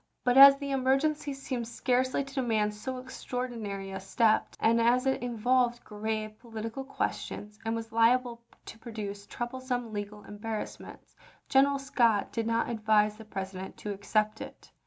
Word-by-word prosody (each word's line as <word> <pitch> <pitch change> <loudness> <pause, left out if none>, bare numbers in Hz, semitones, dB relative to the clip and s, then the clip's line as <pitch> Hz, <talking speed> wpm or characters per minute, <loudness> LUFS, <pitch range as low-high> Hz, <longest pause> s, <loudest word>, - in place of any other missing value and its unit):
But 245 0 +2
as 275 +1 +10
the 280 0 -5
emergency 275 +3 +1
seemed 260 -3 -4
scarcely 255 +3 0
to 275 0 -12
demand 220 -6 +1
so 255 +5 -5
ex 255 +1 -9
traordinary 215 -6 -4
a - - -4
step, 215 +3 +1
and 230 +1 +3
as 245 +3 +3
it 265 - +1
involved 245 +1 +1
grave 215 0 -4
politi 225 -1 -6
cal 270 - -5
questions 210 -5 -4
and 225 0 -1
was 225 0 -5
liable 235 +1 +3 0.2
to 225 - -10
produce 205 -3 -6
troublesome 245 -1 -4
legal 205 0 -5
embarrassments, 210 +1 -7 0.3
General 275 +1 +4
Scott 235 -6 +2
did 225 -1 -2
not 230 0 +1
advise 215 -2 +2
the 220 - -11
President 190 -2 -6
to 210 - -5
accept 215 +2 0
it. - - -10
230 Hz, 155 wpm, -29 LUFS, 215-255 Hz, 0.3 s, as